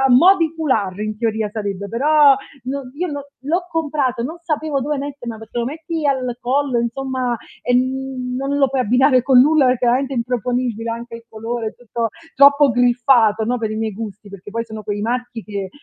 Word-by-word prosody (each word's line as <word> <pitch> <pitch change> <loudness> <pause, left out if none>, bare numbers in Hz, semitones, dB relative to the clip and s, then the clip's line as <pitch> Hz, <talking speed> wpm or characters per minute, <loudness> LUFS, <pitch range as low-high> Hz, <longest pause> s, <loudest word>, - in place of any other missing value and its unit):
a 270 - +4
mò 345 +10 +7
di 325 -3 0
foulard, 220 - 0
in 215 0 -3
teoria 220 -2 -1
sarebbe 200 -2 -4
però, 285 +4 +5 0.3
no 275 +2 -3
io 355 +5 -2
no 285 -1 -5 0.2
l'ho 345 +6 -1
comprato 290 -7 -1
non 305 +8 -4
sapevo 310 -4 -2
dove 290 +2 -2
mettermela, 270 -5 -6
perché 220 +2 -7
lo 235 - 0
metti 315 +3 -3
al 255 -3 0
collo, 265 0 0
insomma, 250 +1 -2 0.3
e, 245 - +1
mhmm, 255 0 -1
non 275 +2 -1
lo 275 -1 +3
puoi 265 0 -1
abbinare 245 +2 +1 0.2
con 255 -1 +6
nulla 300 +2 +5
perché 250 -1 +2
veramente 260 +3 +1
è - - -3
improponibile 240 -1 -1
anche 230 +1 -6
il 230 - -14
colore, 225 +1 -4
è - - -12
tutto 235 -1 -3 0.3
troppo 280 0 +6
griffato, 240 -3 +3
no, 245 +2 0
per 220 -1 -2
i 215 - -3
miei 220 -1 -2
gusti, 210 -1 -8
perchè 200 0 -11
poi 230 +2 -3
sono 220 -1 -8
quei 205 0 -3
marchi 240 +1 -3
che 200 -2 -5
250 Hz, 200 wpm, -19 LUFS, 225-280 Hz, 0.3 s, mò